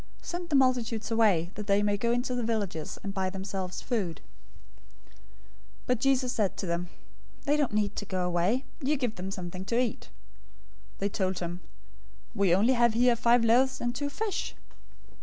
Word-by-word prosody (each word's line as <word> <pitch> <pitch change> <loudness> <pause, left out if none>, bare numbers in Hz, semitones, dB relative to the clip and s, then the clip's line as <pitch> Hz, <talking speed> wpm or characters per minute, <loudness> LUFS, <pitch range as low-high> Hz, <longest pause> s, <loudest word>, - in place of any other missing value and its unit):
Send 345 0 -5
the 295 - +2
multitudes 245 -4 +2
away, 200 -7 +3
that 210 -1 -7
they 200 0 +3
may 205 0 +2
go 235 +3 0
into 245 +1 0
the 245 - -1
villages, 205 -9 -2
and 195 - -4
buy 190 -2 0
themselves 190 -1 -5
food." 200 -9 -2 0.9
014:016 - - -25 0.7
But 250 -2 +1
Jesus 255 -1 +2
said 205 -5 0
to - - -3
them, 170 0 -2 0.5
"They 290 0 +2
don't 290 -3 +1
need 210 -1 +1
to 205 - -3
go 185 -2 -1
away. 180 +9 +1 0.2
You 290 +2 +1
give 245 -5 -1
them 185 +1 -5
something 185 -1 -5
to 230 - 0
eat." 250 -2 -2 0.9
014:017 - - -26
They 200 - -1
told 190 -2 -1
him, 175 +1 -4 0.7
"We 195 -5 +3
only 225 +7 +4
have 235 -2 +3
here 245 0 +4
five 235 0 +4
loaves 255 +3 +4
and 240 0 -1
two 285 +3 -2
fish." 425 +7 -3
220 Hz, 180 wpm, -29 LUFS, 190-250 Hz, 0.9 s, only